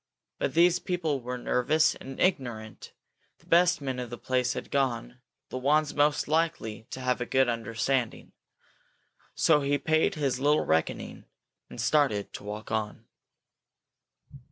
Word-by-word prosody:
But - - -2
these 175 +1 +5
people 165 -8 -2
were 125 +1 -4
nervous 150 +6 +2
and 135 0 -10
ignorant; 120 - -2 0.5
the - - -26
best 175 -1 +4
men 130 -2 -3
of 125 -1 -5
the 120 - -7
place 125 0 0
had - - -7
gone, 125 - -1 0.3
the 130 - -4
ones 150 +3 +2
most 145 0 +2
likely 155 -9 -1
to - - -6
have 125 -1 0
a - - -1
good 130 -1 +3
understanding. 115 +1 -2 1.0
So 150 -2 +4
he 140 +1 +1
paid 160 +6 +1
his 135 -4 -1
little 145 +3 +2
reckoning, 80 0 -1 0.4
and - - -10
started 125 -4 +1
to - - -8
walk 105 +2 -7
on. 110 +1 -3
130 Hz, 145 wpm, -28 LUFS, 120-150 Hz, 1.0 s, these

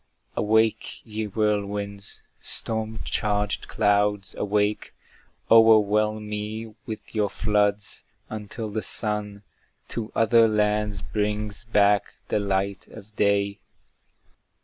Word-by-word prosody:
Awake, 110 +1 +1
ye 110 0 -3
whirlwinds! 100 -1 -2 0.2
storm 110 -1 -1
charged 105 -1 -1
clouds, 105 -2 +1
awake, 105 +1 -1 0.6
O'erwhelm 110 -1 +5
me 105 +1 -5
with 110 -1 -7
your 105 -2 +1
floods, 105 -1 0 0.3
until 110 +1 -6
the 110 +1 -2
sun 105 -2 -2 0.5
To 115 -2 -4
other 115 0 +5
lands 105 -2 0
brings 105 +1 -2
back 105 -2 +3
the - - +1
light 100 -1 -1
of 110 -1 -13
day! 100 0 +1
105 Hz, 100 wpm, -25 LUFS, 100-110 Hz, 0.6 s, O'erwhelm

